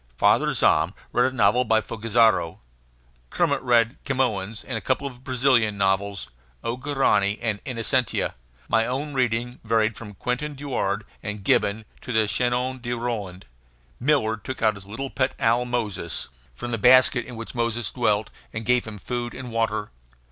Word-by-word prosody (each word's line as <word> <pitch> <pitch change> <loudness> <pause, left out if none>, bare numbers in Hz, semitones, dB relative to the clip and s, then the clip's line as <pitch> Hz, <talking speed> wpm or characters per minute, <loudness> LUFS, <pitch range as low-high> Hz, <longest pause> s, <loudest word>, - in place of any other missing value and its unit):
Father - - +4
Zahm - - +3 0.2
read 125 +2 +2
a - - -11
novel 115 +2 +4
by 110 -2 +3
Fogazzaro. 110 -6 +2 0.7
Kermit - - +1
read 120 -1 +3
Camoens 115 -6 -1
and 125 - -5
a 110 - -2
couple 130 +6 0
of 130 -2 -7
Brazilian 125 -5 +2
novels, 100 -3 0 0.3
"O 115 - -1
Guarani" 125 -7 +1
and 110 -3 -2
"Innocencia." 125 -1 0 0.3
My 115 -1 +2
own 140 +4 -3
reading 120 -1 -1
varied 110 -1 +1
from 105 -3 -9
"Quentin 135 +8 -3
Durward" 125 -7 -2 0.2
and 105 -1 -5
Gibbon 100 +3 +2 0.2
to - - -6
the 110 -2 +3
"Chanson 125 +3 0
de 120 0 -3
Roland." 110 -6 -4 0.5
Miller 125 -6 +2
took 125 +4 -6
out 110 -1 +4
his 100 -1 -11
little 130 +6 -5
pet 130 0 0
owl 120 +2 +2
Moses, 120 - -2 0.3
from 120 0 -5
the 115 - -1
basket 125 +1 +5
in 125 - -8
which 115 0 -7
Moses 115 -2 -1
dwelt, 110 -4 0 0.2
and 110 0 -5
gave 125 +1 +2
him 110 -2 -7
food 120 +3 -4
and 125 -2 -7
water. 110 -2 -1
115 Hz, 160 wpm, -24 LUFS, 105-125 Hz, 0.7 s, basket